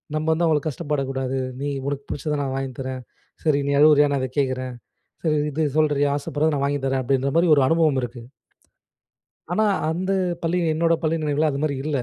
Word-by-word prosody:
நம்ம 155 0 -1
வந்து 170 +2 +1
அவங்கள 155 -2 +3
கஷ்டப்படக் 145 -2 -2
கூடாது. 135 0 -2 0.2
"நீ 145 - -2 0.2
உனக்கு 140 0 -3
பிடிச்சத 150 +1 -2
நான் 135 -2 -2
வாங்கி 135 -1 -3
தரேன். 130 -1 -4 0.4
சரி 150 -3 +2
நீ - - +1
அழுவுறியா! 150 -1 +6
நான் 140 - +1
அத 130 - -1
கேட்கிறேன். 130 -2 -2 0.5
சரி 155 -2 +2
இது 155 +2 -1
சொல்றீயா? 145 -2 +2
ஆசைப்படுறத 150 +2 -1
நான் 140 -1 0
வாங்கி 145 0 -1
தரேன்." 135 0 0
அப்பிடின்றமாரி 140 +6 +1
ஒரு 140 - +4
அனுபவம் 160 -4 +3
இருக்கு. 120 0 -6 1.3
ஆனா, 215 +5 +2 0.2
அந்த 185 +4 -2 0.3
பள்ளி 165 +2 +1 0.2
என்னோட 165 +1 +2
பள்ளி 160 0 +1
நினைவுல 150 +1 +1
அது 140 - -3
மாரி 150 -2 0
இல்ல. 150 -2 0
145 Hz, 185 wpm, -23 LUFS, 135-155 Hz, 1.3 s, அழுவுறியா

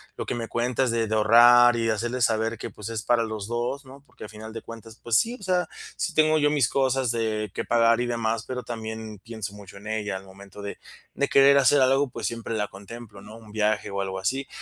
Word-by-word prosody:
lo - - -5
que - - -3
me 115 -1 -4
cuentas 125 +2 0
de 115 -1 0
de 110 - -1
ahorrar 120 +3 +7
y 115 -1 -1
de 115 - +2
hacerle 120 +4 -2
saber 115 0 +1
que, - - -6
pues, 105 - -9
es 110 -2 -4
para 120 -1 +2
los 110 -2 -5
dos, 120 +4 -3
¿no? 135 +2 -13
Porque - - -14
al - - -10
final 110 +1 -10
de 115 - -6
cuentas, 115 0 -11
pues 120 -1 0
sí, 235 +2 +1
o - - -13
sea, 180 -1 +1 0.3
sí - - -2
tengo 155 0 +4
yo 145 0 +3
mis 145 -6 +2
cosas 130 -2 +1
de 110 -3 -2
que - - -3
pagar 115 0 +3
y - - 0
demás, 115 -2 -1
pero 125 -1 -5
también 110 -2 -7
pienso 110 -1 -7
mucho 100 -1 -12
en 105 +2 -11
ella, 105 -3 -2
al 95 - -12
momento 100 +1 -13
de 100 - -6 0.4
de 140 - 0
querer 140 0 +6
hacer 140 +1 +5
algo, 135 +1 +3
pues - - -4
siempre 115 -1 -5
la 105 -1 -1
contemplo, 100 +1 -11
¿no? 105 +2 -12
Un 110 -2 -15
viaje 110 0 0
o 100 0 -4
algo 95 -1 -4
así, 135 +9 -2
115 Hz, 245 wpm, -25 LUFS, 105-125 Hz, 0.4 s, ahorrar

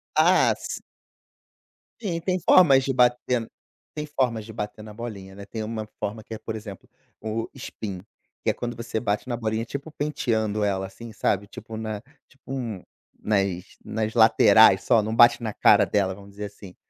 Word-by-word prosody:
Ah, - - +5
s - - -5 1.2
Sim, 175 -7 -2
tem 185 +1 0
formas 140 -7 +6
de 135 - -1
bater 125 -1 +2 0.5
tem 150 0 -4
formas 125 -6 -1
de 110 - -10
bater 105 0 -6
na 110 - -10
bolinha, 105 -4 -8
né. 100 0 -9
Tem 110 +2 -6
uma 110 -1 -4
forma 110 +2 -4
que 110 - -9
é, 110 - -6
por 110 - -5
exemplo, 105 -3 -9 0.3
o 110 +1 -3
spin, 100 -4 -6 0.4
que - - +1
é - - +2
quando 120 0 -5
você 115 -1 -3
bate 105 +3 -2
na 120 - -1
bolinha 110 0 -2
,tipo 140 +5 -6
penteando 110 -8 -1
ela 95 -1 0
assim, 115 +3 -11
sabe. 100 -1 0
Tipo 110 +2 -9
na 110 -2 -4 0.3
tipo 135 0 -14
um 115 -8 -4 0.4
nas 100 -4 0 0.2
nas 110 0 -2
laterais 110 -3 +6
só, 115 -3 +4
não 110 +2 -2
bate 120 0 +6
na 110 - -3
cara 105 0 +5
dela, 95 -2 0
vamos 100 0 -14
dizer 105 +1 -6
assim. 100 -2 -11
110 Hz, 180 wpm, -25 LUFS, 105-120 Hz, 1.2 s, formas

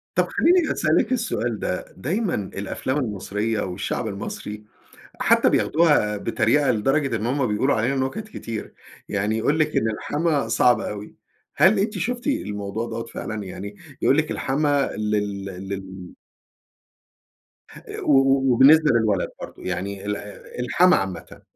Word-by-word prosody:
طب - - +2
خلّيني 350 -1 +3
أسألِك - - +1
السؤال 120 - -1
ده. 90 - -3
دايمًا 180 - -1
الأفلام 100 +6 -3
المصرية، 105 -2 -2
والشعب 90 -1 -3
المصري 105 +1 -6 0.6
حتى - - +4
بياخدوها 150 -10 +3
بتريقة 115 +7 +1
لدرجة 135 +3 +1
إن 110 +1 -3
هم 130 +2 +1
بيقولوا 110 +6 +1
علينا 125 +5 0
نُكت 135 +12 -2
كتير. 115 - -7 0.3
يعني 105 +2 -1
يقول 145 +7 +1
لِك 155 - +1
إن 110 - +2
الحَمَاة 145 +3 -1
صعب 115 +1 +4
أوي. 105 -1 -6 0.4
هل 195 +2 +5
أنتِ 205 +1 -1
شُفتِ 245 +7 -3
الموضوع 105 - -2
دوّة 115 0 -4
فعلًا 110 -2 -6
يعني؟ 100 +2 -8 0.3
يقول 135 - +4
لِك 155 -1 +1
الحَمَاة 145 0 0
لل 105 -2 -1
لل 95 -1 -7 1.9
و - - +2
و 135 -1 +4
وبالنسبة 150 +5 +6
للولد 110 -5 +2
برضه. - - -9
يعني 95 +2 -4
ال 105 0 -1 0.4
الحَمَاة 180 +9 +4
عامةً. 95 -4 -6
115 Hz, 135 wpm, -23 LUFS, 105-145 Hz, 1.9 s, وبالنسبة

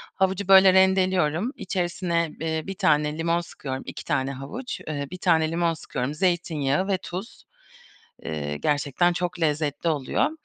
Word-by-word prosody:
Havucu, 190 0 0
böyle, 190 -1 +8
rendeliyorum, 190 - +3
içerisine, 175 -3 -1
eee, 160 -1 -1
1 195 - -4
tane 150 -3 +2
limon 165 +1 +1
sıkıyorum. 135 -5 -6
2 - - -7
tane 140 -3 0
havuç, 140 - -6
eee, 145 -2 -3
1 185 - -6
tane 160 -3 +2
limon 170 0 +1
sıkıyorum, 140 -3 -4
zeytinyağı 165 -1 0
ve 195 -2 +1
tuz. 185 +4 -8 0.8
Eee, 75 -2 -4
gerçekten 145 - +1
çok 175 0 -3
lezzetli 150 0 0
oluyor. 145 -5 0
165 Hz, 145 wpm, -25 LUFS, 150-185 Hz, 0.8 s, böyle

